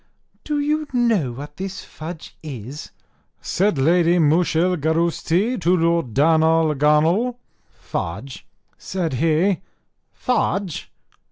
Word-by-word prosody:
"Do 300 -1 -1
you 300 +1 0
know 225 - +2
what 145 +4 -9
this 190 0 -5
fudge 160 +1 -9
is?" 140 -1 -8 0.5
said 195 -2 0
Lady 170 +5 +3
Mooshilgarousti 170 - +1
to 175 +2 +3
Lord 165 -8 0
Darnarlaganl. 160 - +3 0.4
"Fudge!" 105 +11 -6 0.3
said 175 -6 -3
he, 165 +7 +2 0.5
"Fudge! 200 - -2
165 Hz, 90 wpm, -21 LUFS, 150-190 Hz, 0.5 s, Lady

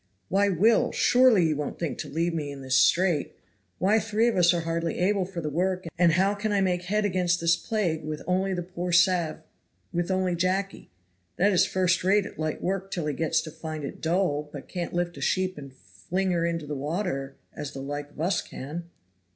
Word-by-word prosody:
"Why, 200 +2 +3
Will! 205 +5 +3
surely 245 -8 +5
you 155 -1 +1
won't 150 0 -4
think 165 - -3
to - - -5
leave 165 +3 -1
me 150 -3 -3
in 140 -1 -9
this 130 0 -3
strait? 175 +1 +3 0.4
Why 210 +4 +3
three 220 +2 +1
of 235 - +1
us 175 -2 +5
are 175 -1 0
hardly 165 0 -2
able 190 +1 +1
for 180 -2 -6
the 155 - -3
work, 185 +3 -1
and 170 -1 +4
how 190 +3 +3
can 205 +1 -2
I 200 - +2
make 180 -2 0
head 210 +3 0
against 180 -2 +1
this 170 0 +3
plague 175 -7 -2
with 155 0 -5
only 190 +1 0
the 175 - -3
poor 180 0 -4
sav 175 -3 +3 0.5
with 175 +1 -1
only 185 -1 +1
Jacky, 185 +3 -1 0.5
that 200 +3 +3
is 185 -1 +4
first 185 -2 +1
rate 200 +2 +3
at - - -10
light 155 -1 -3
work 195 +1 -2
till 170 -5 -3
he 150 - -1
gets 160 +2 +1
to 155 - -8
find 155 -1 -6
it 140 - -7
dull 160 -4 0
but 145 -3 -9
can't 175 -2 -4
lift 175 0 -1
a - - -8
sheep 185 0 0
and 140 -2 -9
fling 165 - -3
her 170 -1 +1
into 165 -2 -3
the 150 - -5
water, 145 -1 -3 0.2
as 150 -2 -5
the - - -8
like 145 +1 -5
of 145 - -17
us 180 +4 +1
can?" 165 +6 -7
175 Hz, 215 wpm, -26 LUFS, 155-190 Hz, 0.5 s, surely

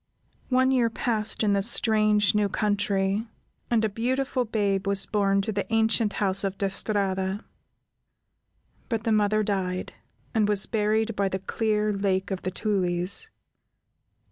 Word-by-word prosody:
One 260 0 +3
year 245 -3 +2
passed 220 -1 0
in 205 -1 +2
the 200 - +2
strange, 215 -2 +2
new 210 -1 +1
country, 205 0 0 0.4
and 225 -2 +2
a - - +3
beautiful 255 +4 -1
babe 200 -3 -1
was 200 -1 +3
born 195 -1 +1
to 220 - -2
the 200 +1 -4
ancient 225 -1 +2
house 195 -1 -1
of 195 -1 -2
De 195 -1 -1
Strada, 195 -1 -1 1.4
but 225 -3 -2
the 230 - 0
mother 215 0 +2
died, 185 -3 -2 0.4
and 215 -3 +2
was 205 -2 +2
buried 220 0 0
by 200 -1 0
the 190 - -2
clear 210 +2 -1
Lake 195 -1 -1
of 190 - -3
the 185 - -2
Tulies. 185 - 0
210 Hz, 145 wpm, -26 LUFS, 195-220 Hz, 1.4 s, One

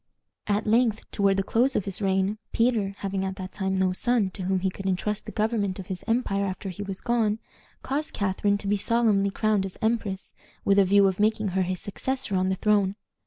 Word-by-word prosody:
At 205 +1 +1
length, 225 0 +2
toward 200 -2 +2
the 195 - +1
close 250 +7 +2
of 200 - 0
his 195 +1 -4
reign, 195 +2 +1
Peter, 225 -5 +1
having 195 -1 -2
at 190 0 -3
that 185 -1 -7
time 190 -1 -1
no 185 -1 +2
son 220 -1 +1
to 190 - -8
whom 185 0 0
he 190 0 0
could 195 +1 -6
intrust 200 +3 -1
the - - -5
government 210 -3 0
of 190 - -7
his 180 - -8
empire 225 -4 +1
after 190 0 -4
he 185 +2 -7
was 195 -2 -5
gone, 225 -3 +1 0.5
caused 290 +3 -2
Catharine 200 +1 0
to 200 - -6
be 205 +1 +2
solemnly 210 -2 +2
crowned 210 0 +1
as 190 -1 -6
empress, 220 -4 -1 0.3
with 200 0 +5
a 195 - +6
view 200 +1 +5
of 190 0 -1
making 215 -1 +2
her 190 +1 0
his 185 0 -2
successor 260 +1 -2
on 185 0 +2
the 190 - +1
throne. 200 -1 +2
200 Hz, 215 wpm, -26 LUFS, 190-215 Hz, 0.5 s, a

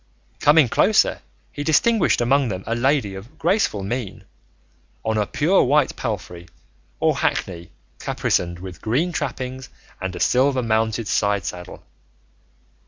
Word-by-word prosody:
Coming 150 -2 +5
closer, - - +2 0.3
he 145 - -5
distinguished 185 - +3
among 135 +3 +2
them 95 -3 -4
a 115 - -2
lady 125 -3 +1
of 110 +11 -11
graceful 170 - +1
mien, 100 -2 -4 0.8
on 110 - 0
a 105 - 0
pure 175 +6 +2
white 145 +1 +2
palfrey 90 -7 -5 0.5
or - - +2
hackney 85 -2 -2 0.3
caparisoned 85 0 -1
with 90 0 -9
green 140 +11 0
trappings 130 -5 -4 0.3
and 95 -1 -4
a - - -6
silver 130 +3 +2
mounted 110 0 0
side 100 -2 0
saddle. 90 0 -7
115 Hz, 130 wpm, -22 LUFS, 95-140 Hz, 0.8 s, Coming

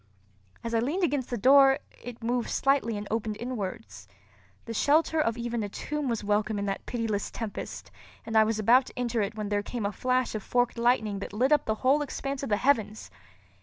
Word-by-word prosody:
As 230 - -4
I 230 - +3
leaned 300 +11 -1
against 290 -6 0
the 245 - -2
door, 270 +4 +6 0.3
it 240 -1 -9
moved 240 +1 -1
slightly 270 -5 +1
and 205 0 -6
opened 220 -1 -2
inwards. 185 - -6 0.6
The 230 - -5
shelter 315 +6 +2
of 230 -5 0
even 235 -1 -2
a 205 - -3
tomb 295 +6 -3
was 230 -3 -2
welcome 210 +1 0
in 200 - -2
that 195 -1 -4
pitiless 225 -4 -2
tempest 225 -3 -6 0.3
and 225 - -5
I 220 - +7
was 215 0 0
about 240 +5 +4
to - - -13
enter 240 -2 0
it 205 +1 -2
when 210 -2 -4
there 205 0 +1
came 225 +1 -4
a 200 - 0
flash 255 +4 0
of 215 - -3
forked 245 +2 0
lightning 220 -4 +1
that 200 - -7
lit 255 +7 +1
up 300 -2 +4
the 220 - 0
whole 280 +3 +4
expanse 275 -1 -4
of 275 - -4
the 205 - +2
heavens. 220 -5 0
230 Hz, 210 wpm, -28 LUFS, 210-255 Hz, 0.6 s, I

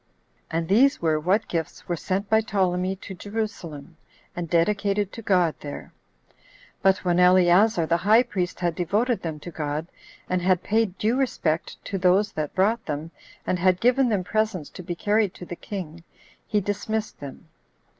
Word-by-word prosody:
11. 165 - -2
And 165 0 -2
these 255 - +4
were 160 -2 +1
what 190 +7 +1
gifts 165 -2 -4
were 175 - 0
sent 190 +5 -2
by 220 +1 +4
Ptolemy 190 -3 0
to 190 +1 -9
Jerusalem, 180 -6 -6 0.4
and 175 -2 -4
dedicated 200 +3 +1
to 230 - -7
God 180 -6 +2
there. 145 -1 -8 0.9
But 190 0 +2
when 175 0 +2
Eleazar 180 +2 +5
the 170 +1 +2
high 215 +7 +5
priest 185 -7 -3
had 175 -1 +1
devoted 210 +9 0
them 160 -3 -5
to 175 - -8
God, 150 0 -3 0.4
and 185 0 0
had 185 0 +2
paid 215 -3 0
due 225 +4 +1
respect 170 -12 -1
to 195 - -3
those 190 +3 +3
that 155 -2 -4
brought 220 +5 +2
them, 155 +2 -4 0.3
and 180 - 0
had 185 0 +3
given 250 +1 +3
them 205 -4 0
presents 215 -6 -1
to - - -9
be 175 -1 -5
carried 205 +1 +1
to 180 - -9
the 175 - -6
king, 170 -4 -7 0.4
he 210 -2 +1
dismissed 210 +2 -3
them. 140 -2 -9
185 Hz, 175 wpm, -25 LUFS, 170-210 Hz, 0.9 s, Eleazar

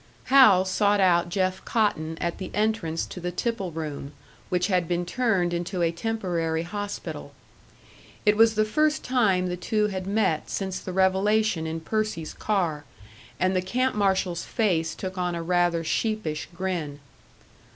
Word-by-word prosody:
Hal 210 -9 +7
sought 205 +2 +2
out 175 -2 +3
Jeff 185 0 -1
Cotton 165 -8 0
at 170 0 -2
the 190 - -5
entrance 210 -7 0
to - - -8
the 180 0 -3
tipple 195 0 -2
room, 150 -3 -6 0.4
which 180 0 +1
had 180 -4 +1
been 175 +1 -1
turned 190 -5 +1
into 175 +1 -2
a 165 - +2
temporary 170 -5 -2
hospital. 175 -6 -6 0.9
It 210 0 +5
was 225 +1 +5
the 215 0 +3
first 305 +7 +1
time 210 -8 +2
the 180 -1 -2
two 210 +3 0
had 185 -1 -4
met 195 -6 0
since 190 -2 -3
the 185 - -6
revelation 190 -1 +2
in 160 0 -4
Percy's 215 -4 -2
car, 175 -8 -1 0.6
and 185 +1 +2
the 185 - +2
camp 255 +8 0
marshal's 190 -4 0
face 175 -8 0
took 185 -1 -5
on 180 -1 -1
a 170 - -4
rather 175 -1 +1
sheepish 215 -4 -2
grin. 170 -5 -3
185 Hz, 155 wpm, -26 LUFS, 170-210 Hz, 0.9 s, Hal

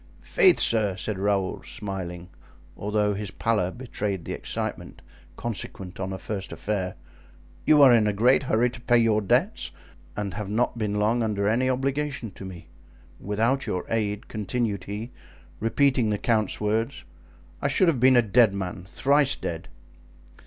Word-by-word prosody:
"Faith, 390 -7 +5
sir," 105 -4 +2
said 95 +1 -4
Raoul, 100 -1 0
smiling, 90 -3 -6 0.4
although 105 0 0
his 100 0 -4
pallor 105 -5 0
betrayed 100 -6 -4
the - - -4
excitement - - -5 0.4
consequent 95 -5 -4
on 95 0 -3
a 95 - -4
first 95 -1 -5
affair, 95 -3 -3 0.7
"you 150 -2 +7
are 130 -3 +8
in 110 -3 +4
a - - +2
great 120 +6 +4
hurry 125 -2 +1
to 125 -1 -10
pay 120 0 +3
your 115 -2 +3
debts 125 - +1 0.5
and 100 -3 -3
have 100 +2 -5
not 115 +4 0
been 105 -3 -2
long 110 +3 +2
under 105 -3 0
any 125 +4 +2
obligation 135 -2 -2
to 95 - -11
me. 90 -2 -10 0.5
Without 115 +7 0
your 90 - -2
aid," 105 -2 -1
continued 105 -1 -2
he, 105 +4 -6 0.5
repeating 125 0 +2
the 105 - 0
count's 110 -2 0
words 110 +2 -1 0.6
"I - - +1
should 145 +7 +3
have 155 -7 +2
been 130 +1 +6
a 120 - +5
dead 110 -1 +4
man—thrice 100 +10 +1
dead." 85 -1 -5
110 Hz, 155 wpm, -25 LUFS, 100-125 Hz, 0.7 s, are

